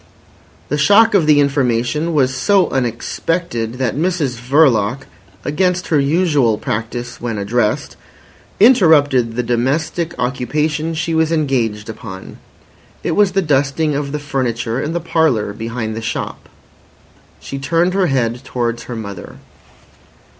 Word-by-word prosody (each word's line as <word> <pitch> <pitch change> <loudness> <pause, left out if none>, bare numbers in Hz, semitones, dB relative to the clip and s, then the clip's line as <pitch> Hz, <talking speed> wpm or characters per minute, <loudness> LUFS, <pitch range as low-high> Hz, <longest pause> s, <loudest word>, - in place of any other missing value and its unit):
The 150 - -1
shock 205 +9 +5
of 180 -6 +3
the 150 -1 +5
information 140 +3 0
was 135 -3 +2
so 195 +7 +2
unexpected 120 0 -2
that 125 -3 -1
Mrs 160 -5 -1
Verloc, 130 -3 +3 0.4
against 180 +4 0
her 155 - +3
usual 145 -6 +2
practice 120 +3 -4
when 115 -3 -3
addressed, 105 +2 -1 0.6
interrupted 150 - +4
the 125 - -1
domestic 150 +8 -1
occupation 150 +6 -1
she 165 +1 -2
was 160 0 +2
engaged 125 -9 0
upon. 105 -4 -9 0.7
It - - -1
was 195 +2 +3
the 195 0 +1
dusting 145 +1 +1
of 140 0 -3
the 150 - -2
furniture 130 -4 -2
in 155 - -3
the 175 - -1
parlour 150 -12 +1
behind 115 0 -4
the 115 - -5
shop. 110 - -5 0.9
She 135 - -7
turned 165 +6 +1
her 190 -2 +2
head 125 -3 -1
towards 120 -2 -3
her 125 - -6
mother. 100 -5 -8
135 Hz, 130 wpm, -17 LUFS, 120-160 Hz, 0.9 s, shock